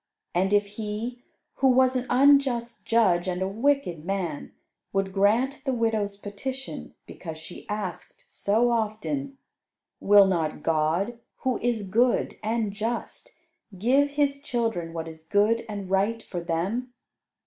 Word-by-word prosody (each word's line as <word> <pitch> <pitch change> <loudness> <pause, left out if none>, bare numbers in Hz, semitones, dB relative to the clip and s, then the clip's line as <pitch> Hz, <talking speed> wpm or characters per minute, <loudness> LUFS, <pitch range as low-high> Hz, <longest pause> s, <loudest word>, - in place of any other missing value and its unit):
And 190 +3 +1
if 205 0 +4
he, 215 +4 -5 0.4
who 270 - +3
was 260 0 +4
an 255 0 -1
unjust 260 -3 +3
judge 190 -7 +3
and 180 -1 -1
a 190 - 0
wicked 225 - 0
man, 180 -5 -3 0.4
would 195 -1 -1
grant 225 +8 +2
the 265 - 0
widow's 220 -4 0
petition, 255 +7 -6
because 160 -3 -8
she 160 +2 -11
asked 210 0 -5
so 225 +4 +1
often, 235 +5 -2 0.6
will 205 0 +7
not 165 -5 -1
God, 165 +9 +1 0.2
who 255 -2 0
is 225 -4 -1
good 235 +6 +2
and 220 -1 -1
just, 235 - -4 0.4
give 265 +8 +3
His 280 -1 0
children 225 -11 -2
what 165 -1 -5
is 160 0 -10
good 210 +6 +2
and 205 -2 -5
right 200 +4 +1
for 180 - -5
them? 185 +10 -2
215 Hz, 135 wpm, -26 LUFS, 190-245 Hz, 0.6 s, will